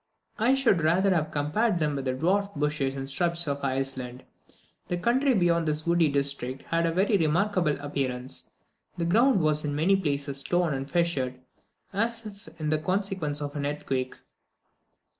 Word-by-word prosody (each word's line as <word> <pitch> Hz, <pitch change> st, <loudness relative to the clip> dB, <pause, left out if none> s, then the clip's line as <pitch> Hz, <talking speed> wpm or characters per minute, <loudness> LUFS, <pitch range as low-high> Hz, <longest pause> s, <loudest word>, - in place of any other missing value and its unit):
I 245 Hz, +5 st, +4 dB
should 235 Hz, -10 st, +3 dB
rather 185 Hz, +5 st, +3 dB
have 160 Hz, -3 st, 0 dB
compared 155 Hz, +8 st, 0 dB
them 150 Hz, -3 st, 0 dB
with 135 Hz, -1 st, -4 dB
the 130 Hz, -, 0 dB
dwarfed 195 Hz, +8 st, 0 dB
bushes 145 Hz, -2 st, -1 dB
and 135 Hz, 0 st, -5 dB
shrubs 170 Hz, +3 st, +1 dB
of 140 Hz, 0 st, -2 dB
Iceland. 130 Hz, -2 st, -2 dB, 0.6 s
The 175 Hz, -, -1 dB
country 255 Hz, +7 st, +2 dB
beyond 170 Hz, -3 st, +2 dB
this 150 Hz, 0 st, 0 dB
woody 170 Hz, -2 st, +3 dB
district 140 Hz, -2 st, -2 dB
had 165 Hz, 0 st, 0 dB
a -, -, +1 dB
very 195 Hz, +5 st, +2 dB
remarkable 170 Hz, -1 st, +1 dB
appearance; 130 Hz, -3 st, -3 dB, 0.5 s
the 170 Hz, -, -1 dB
ground 230 Hz, +4 st, +4 dB
was 155 Hz, -1 st, +1 dB
in 145 Hz, -1 st, -2 dB
many 170 Hz, +6 st, +3 dB
places 140 Hz, -6 st, -2 dB
torn 175 Hz, +2 st, +1 dB
and 135 Hz, +1 st, -4 dB
fissured, 140 Hz, -7 st, 0 dB, 0.5 s
as 225 Hz, +3 st, 0 dB
if 200 Hz, -6 st, -10 dB
in 155 Hz, -1 st, -1 dB
consequence 185 Hz, -5 st, -1 dB
of 145 Hz, 0 st, -5 dB
an 145 Hz, -, -2 dB
earthquake. 135 Hz, -3 st, -2 dB
155 Hz, 160 wpm, -27 LUFS, 140-185 Hz, 0.6 s, I